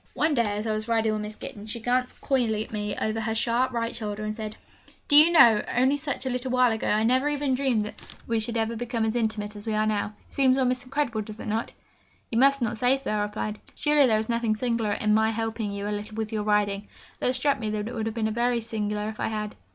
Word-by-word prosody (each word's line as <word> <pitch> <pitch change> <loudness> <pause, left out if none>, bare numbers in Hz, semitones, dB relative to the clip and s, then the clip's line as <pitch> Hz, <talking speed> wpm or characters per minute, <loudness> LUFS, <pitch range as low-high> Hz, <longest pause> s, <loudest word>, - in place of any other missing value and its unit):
One 310 0 +2
day, 220 -6 +1
as 210 - -3
I 220 - 0
was 215 +1 -3
riding 225 -1 +2
with 215 0 -2
Miss 210 0 -5
Gittens, 210 0 -9
she 235 - -1
glanced 250 +2 -1
coyly 230 -6 +1
at - - -17
me 210 -1 -3
over 220 +1 -1
her 220 0 -2
sharp 240 +3 +1
right 230 -1 -2
shoulder, 210 -1 -4
and 215 0 -2
said, 215 -1 -6 0.5
'Do 290 - +4
you 305 +3 +9
know, 235 -10 +7
only 260 +3 +3
such 280 -2 -4
a - - 0
little 250 +1 -3
while 255 -1 +4
ago, 220 - -2
I 215 +1 +2
never 260 +5 +3
even 290 -2 0
dreamed 255 -5 +1
that 210 - -9 0.2
we 230 -1 0
should 230 +2 -2
ever 225 +1 0
become 230 -1 -2
as 220 +1 -1
intimate 215 -3 -1
as 205 +2 -10
we 220 - 0
are 215 0 +2
now; 210 -1 -1
it - - -24
seems 265 -1 +3
almost 255 0 +1
incredible, 255 -4 -1
does 215 +1 -9
it - - -7
not?' 220 +1 -2 0.6
'You 230 - +1
must 275 0 +4
not 220 -1 -2
say 250 +3 +3
so,' 270 - -4
I 210 - 0
replied. 210 0 -3 0.2
'Surely 295 -2 +4
there 220 -3 +3
is 220 0 -2
nothing 230 -2 0
singular 230 -2 0
in 210 +1 +1
my 220 +1 +3
helping 225 -1 -2
you 200 0 -4
a 210 - -1
little 210 +1 -6
with 220 0 -3
your 215 - 0
riding?' 205 -1 0 0.3
Though - - +1
it 255 - +1
struck 275 -1 +1
me 220 -2 -2
that 210 0 -2
it 240 - -6
would 225 -2 -2
have 225 - -4
been 220 -1 -1
very 240 +1 +1
singular 210 -2 -2
if 215 0 -6
I - - 0
had. 215 -1 -4
225 Hz, 265 wpm, -26 LUFS, 215-250 Hz, 0.6 s, you